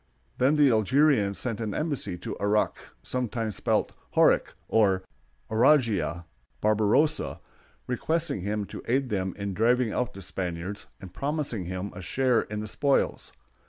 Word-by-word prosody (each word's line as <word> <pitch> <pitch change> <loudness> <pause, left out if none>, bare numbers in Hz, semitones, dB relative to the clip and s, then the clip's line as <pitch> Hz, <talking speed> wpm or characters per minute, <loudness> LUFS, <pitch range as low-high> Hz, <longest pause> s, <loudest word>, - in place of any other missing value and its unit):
Then 135 +4 +4
the 145 -3 +5
Algerians 110 -1 +3
sent 115 -3 -3
an 110 -2 -3
embassy 140 - -2
to - - -6
Aruck 105 +1 +2 0.3
(sometimes 115 -4 -2
spelled - - 0 0.2
Horuk, - - +4
or 95 -4 +3 0.5
Ouradjh) 110 - +3 0.4
Barbarossa, 110 +9 +2 0.5
requesting 160 - -1
him 105 +2 -2
to - - -8
aid 130 +2 +1
them 95 -3 -2
in 100 -1 -3
driving 115 +2 +2
out 125 0 -2
the 95 - -8
Spaniards, 90 +2 -4
and 90 -2 -11
promising 140 - -2
him 95 +3 -4
a 95 - -8
share 125 +7 +2
in 105 0 -5
the 110 - -5
spoils. 140 +6 0
110 Hz, 140 wpm, -27 LUFS, 100-130 Hz, 0.5 s, the